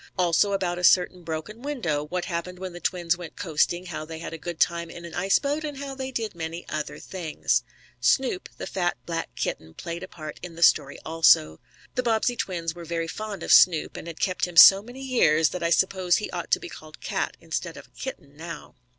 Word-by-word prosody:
Also 180 +3 +3
about 180 -2 -1
a - - -6
certain 180 0 +4
broken 165 +7 -6
window; 210 - -2
what 180 +3 -3
happened 180 +1 -4
when 185 -1 -6
the 175 - -8
twins 175 0 0
went 175 -3 -9
coasting, 175 -1 0
how 165 -3 -5
they 160 +1 -7
had 165 - -7
a - - -5
good 170 0 -6
time 170 -1 +1
in 170 +1 -9
an 170 - -9
ice 190 +3 +3
boat, 290 +2 -2
and 295 -2 -5
how 275 0 -5
they 265 -1 -5
did 225 -4 -3
many 165 +1 -6
other 155 -1 -4
things. 175 -5 -1 0.4
Snoop, 260 -9 +1
the - - -5
fat, 175 -2 -1
black 165 -1 -3
kitten, 80 0 -4
played 170 0 -6
a 185 - -6
part 155 -4 -9
in 175 -2 -8
the 170 - -1
story 145 -3 +4
also. 155 - +4 0.3
The 250 - 0
Bobbsey 240 0 +1
twins 170 -7 -3
were 175 0 -9
very 165 0 -3
fond 205 0 -6
of - - +3
Snoop, 165 -4 +5
and - - -7
had 165 -1 -8
kept 185 -1 0
him 175 -2 -9
so 195 +3 +11
many 245 +5 -10
years 160 - +3
that 180 - -5
I 170 - +1
suppose 185 +1 +3
he 210 - -4
ought - - -5
to - - +3
be - - -8
called - - -12
cat, - - -2
instead - - -4
of - - -10
a - - -28
kitten, 145 - -8
now. 165 +2 -8
175 Hz, 225 wpm, -26 LUFS, 165-195 Hz, 0.4 s, so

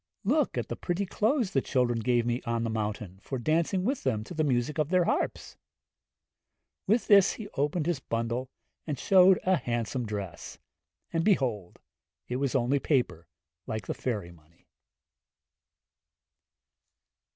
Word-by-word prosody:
'Look 280 +8 +1
at - - -2
the - - -4
pretty 180 +3 -2
clothes 220 +2 0
the 135 - +2
children 125 -3 +1
gave 120 +1 +1
me 120 +1 -1
on 115 0 -1
the 115 - -1
mountain, 105 -3 -4
for 135 - -4
dancing 165 - +1
with 260 +6 -1
them 105 -1 -1
to 145 - -9
the 155 -2 0
music 135 +2 0
of 150 -1 +1
their 180 0 +3
harps.' - - -2 1.3
With 220 +4 +2
this 200 -1 +6
he 220 - -7
opened 150 +2 -1
his 170 -4 0
bundle, 115 +1 -3 0.4
and 150 -3 -2
showed 185 +4 +6
a 185 0 +3
handsome 120 -1 -2
dress; 100 -5 -6 0.6
and 165 0 +1
behold, 125 - 0 0.5
it 125 - -2
was 140 0 -1
only 135 +2 +2
paper, 125 - 0 0.4
like 110 -3 -4
the - - -2
fairy 105 -9 -3
money. 85 0 -22
130 Hz, 150 wpm, -28 LUFS, 115-175 Hz, 1.3 s, this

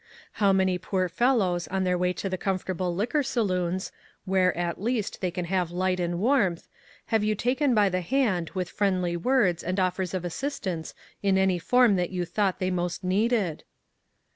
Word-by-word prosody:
How 200 -1 +5
many 190 -1 +2
poor 185 0 -1
fellows 185 -3 +1
on 190 0 -1
their 180 -1 +1
way 180 0 +1
to 190 - -4
the 190 - -2
comfortable 185 -1 -2
liquor 240 - 0
saloons, 185 -8 -1 0.3
where, 185 -1 +2
at 175 0 -2
least, 230 -1 -2
they 185 - 0
can 175 0 -4
have 180 -1 0
light 185 +1 0
arid 175 0 -1
warmth, 200 -4 +1 0.5
have 220 -2 +3
you 215 0 +1
taken 255 +4 +1
by 210 -2 +4
the 185 -1 -1
hand 185 -5 0
with 180 -2 -1
friendly 185 -4 0
words 185 -3 +2
and 185 +2 -1
offers 185 0 -1
of 180 -1 -3
assistance 185 - -4 0.3
in 195 -1 +2
any 190 -2 +2
form 245 +2 +4
that 175 -1 0
you 180 -2 -2
thought 190 +2 0
they 185 0 -1
most 175 +1 -2
needed 200 -2 0
185 Hz, 180 wpm, -26 LUFS, 180-210 Hz, 0.5 s, How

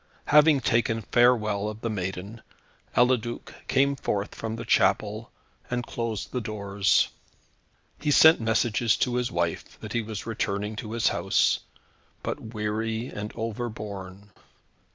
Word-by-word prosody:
Having 150 -1 +5
taken 115 -1 +1
farewell 110 -4 +3
of 110 +1 -8
the 115 - -2
maiden, 95 +2 -5 0.6
Eliduc 120 -1 +1
came 140 +1 +3
forth 105 -6 -2
from 110 0 -4
the 115 - -6
chapel, 105 +4 +2 0.4
and 125 0 -2
closed 115 -3 -4
the 125 - -2
doors. 100 -2 +1 0.9
He 150 - -1
sent 160 0 +7
messages 115 0 +2
to 125 - 0
his 125 -1 -1
wife, 85 -1 -2
that 105 - -7
he 120 - +1
was 110 -2 -6
returning 105 -1 -2
to 110 0 -5
his 115 -1 +2
house, - - +2 0.6
but - - -3
weary 110 +1 -3
and 105 +1 -6
overborne. 105 -4 -6
110 Hz, 130 wpm, -26 LUFS, 105-120 Hz, 0.9 s, sent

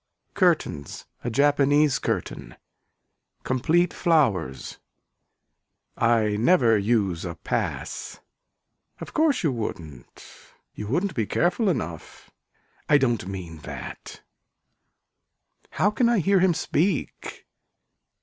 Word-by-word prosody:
Curtains 70 -1 0 0.2
a 120 - -2
japanese 145 +2 +3
curtain. - - -4 0.9
Complete 165 +7 +1
flowers. 110 - 0 1.2
I 110 -3 +2
never 120 -2 +4
use 100 -5 0
a 85 -2 -5
pass. 80 - -4 0.8
Of - - -9
course 310 -7 +2
you 155 - +2
wouldn't. 80 - -7 0.5
You 105 - -7
wouldn't 175 - -1
be 110 -4 -1
careful 185 +5 +1
enough. 85 - -5 0.6
I 145 - +6
don't 120 -9 0
mean 90 -5 -7
that. 75 - -9 1.5
How 205 - +1
can 235 +2 +2
I 235 - +3
hear 195 +1 +3
him 180 -2 +3
speak. 170 0 -2
125 Hz, 100 wpm, -25 LUFS, -, 1.5 s, I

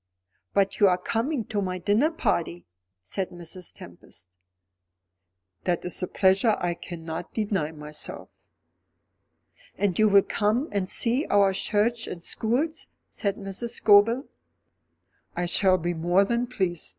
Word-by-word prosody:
"But 195 -1 +1
you 205 - +6
are 180 -1 +3
coming 230 +7 -2
to 205 -2 -2
my 185 -1 -2
dinner 210 - +2
party?" 175 - -2 0.4
said 185 - -3
Mrs. 175 +1 -8
Tempest. 90 - -13 1.4
"That 175 -2 0
is 180 - -2
a 180 - -1
pleasure 195 +4 +3
I 175 -1 -1
cannot 165 -1 -7
deny 200 -8 -1
myself." 150 -1 -3 1.5
"And 200 -3 0
you 215 0 +5
will 200 -1 +6
come 220 +7 0
and 195 -2 -1
see 250 +6 +1
our 200 -1 +4
church 225 +4 0
and 170 - -7
schools?" 275 - -1 0.2
said 200 -3 -2
Mrs. 205 +4 -5
Scobel. 220 +6 +4 1.1
"I 175 - -1
shall 185 +1 +4
be 175 0 -2
more 175 +4 +2
than 235 +3 -1
pleased. 185 -9 -2
195 Hz, 135 wpm, -26 LUFS, 175-225 Hz, 1.5 s, you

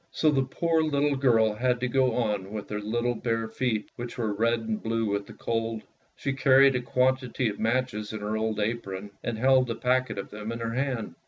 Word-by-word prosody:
So 155 - +2
the 135 -2 +2
poor 160 +5 +1
little 145 -2 +1
girl 115 -5 +3
had 125 +3 0
to 125 - +1
go 130 -1 +2
on 105 -5 -1
with 105 -1 -6
her 105 - -2
little 120 +3 0
bare 115 -1 -1
feet, 110 -1 -1
which 120 0 -6
were 110 -4 -1
red 115 +2 +1
and 110 -1 -3
blue 115 0 -1
with 100 -1 -2
the - - -10
cold. 115 -1 -2 0.3
She 140 - -2
carried 135 0 +5
a 125 - 0
quantity 125 -1 +1
of 105 - -6
matches 115 -2 -1
in 110 -1 -5
her 105 +1 -2
old 110 0 -1
apron, 105 -2 -3
and 115 -2 -2
held 130 +1 +4
a 115 - -1
packet 125 -1 0
of 100 - -6
them 105 +1 -5
in 115 - -4
her 115 0 -3
hand. 130 -3 -2
115 Hz, 220 wpm, -27 LUFS, 110-130 Hz, 0.3 s, carried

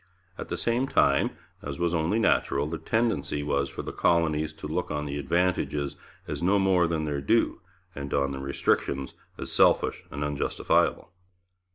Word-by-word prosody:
At - - -7
the - - -2
same 120 +3 0
time, - - +3 0.3
as 70 -1 -5
was 85 0 0
only 85 +5 +1
natural, 70 -10 +2
the 80 +2 -4
tendency 110 -11 0
was 70 -1 0
for - - -6
the - - -5
colonies 80 -2 +2
to 80 -1 -8
look 85 +4 -2
on 75 -1 -2
the 70 0 -3
advantages 80 -2 0 0.3
as - - -4
no 95 +4 +3
more 95 -3 +3
than 80 -2 -1
their 75 -2 -2
due, 115 +12 +1 0.3
and 70 -1 -6
on 70 -1 +1
the 70 - -5
restrictions 70 0 -1 0.2
as - - -6
selfish - - +3
and 70 - -4
unjustifiable. 75 +3 0
75 Hz, 170 wpm, -27 LUFS, 70-90 Hz, 0.3 s, time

